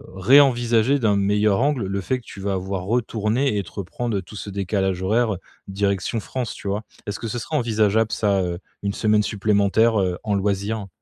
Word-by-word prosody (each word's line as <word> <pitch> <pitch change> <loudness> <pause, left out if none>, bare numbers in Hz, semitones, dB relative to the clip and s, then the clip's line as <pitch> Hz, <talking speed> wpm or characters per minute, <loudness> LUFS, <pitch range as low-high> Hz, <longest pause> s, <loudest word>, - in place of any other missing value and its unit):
réenvisager 120 +3 +4
d'un 110 -5 +2
meilleur 105 +2 +2
angle, 140 -6 +1
le 100 +1 -2
fait, 130 +7 -1
que 120 - -21
tu 100 - -10
vas 100 0 -1
avoir 95 0 -3
retourné 115 +2 0
et 100 - -1
te - - -14
reprendre, 115 +3 -3
heu, - - -2
tout 105 - -13
ce 105 - -6
décalage 95 -1 -1
horaire, 110 +2 +2
heu, - - -7 0.3
direction 100 +2 -1
France, 125 +2 -4
tu - - -9
vois? 100 +2 -2 0.2
Est-ce 105 - -4
que 115 - -4
ce 120 - -3
serait 155 +8 -5
envisageable 110 -3 +2
ça, 100 -2 +1
heu, 85 -1 -3 0.2
1 100 - 0
semaine 105 0 +2
supplémentaire, 105 +1 +2
heu, 90 -2 -1
en 105 -2 0
loisir? 100 +1 -1
105 Hz, 200 wpm, -22 LUFS, 100-115 Hz, 0.3 s, réenvisager